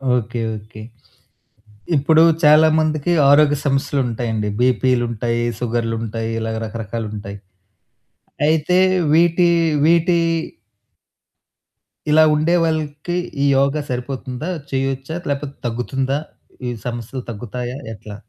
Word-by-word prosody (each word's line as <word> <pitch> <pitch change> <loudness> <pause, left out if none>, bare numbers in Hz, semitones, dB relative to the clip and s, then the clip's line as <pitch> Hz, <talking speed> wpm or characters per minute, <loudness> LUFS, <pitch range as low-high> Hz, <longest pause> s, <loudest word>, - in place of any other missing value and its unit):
Okay. 120 0 -2 0.2
Okay. 110 +1 -12 1.2
ఇప్పుడు 160 +3 +4 0.2
చాలామందికి 155 +1 +4 0.2
ఆరోగ్య 145 0 +5
సమస్యలుంటాయండి. 125 -6 -1
బీపీలుంటాయి, 120 -2 +1 0.2
సుగర్లు 115 -1 -1
ఉంటాయి 115 0 -4
ఇలా 110 0 -3
రకరకాలు 110 0 -5
ఉంటాయి. 100 -1 -7 1.1
అయితే 160 +3 +2 0.4
వీటి, 170 +2 +4 0.4
వీటి 170 +2 +3 1.9
ఇలా 155 +1 +6
ఉండేవాళ్ళకి 160 0 0 0.3
ఈ - - +3
యోగా 140 +2 +1
సరిపోతుందా? 130 +4 -4 0.2
చేయొచ్చా? 135 +2 -2
లేకపోతే 140 0 -3
తగ్గుతుందా? 130 +4 -2 0.5
ఈ - - -1 0.2
సమస్యలు 120 +2 -5
తగ్గుతాయా? 120 +4 -6 0.2
ఎట్లా? 105 0 -10
135 Hz, 90 wpm, -19 LUFS, 115-150 Hz, 1.9 s, ఇలా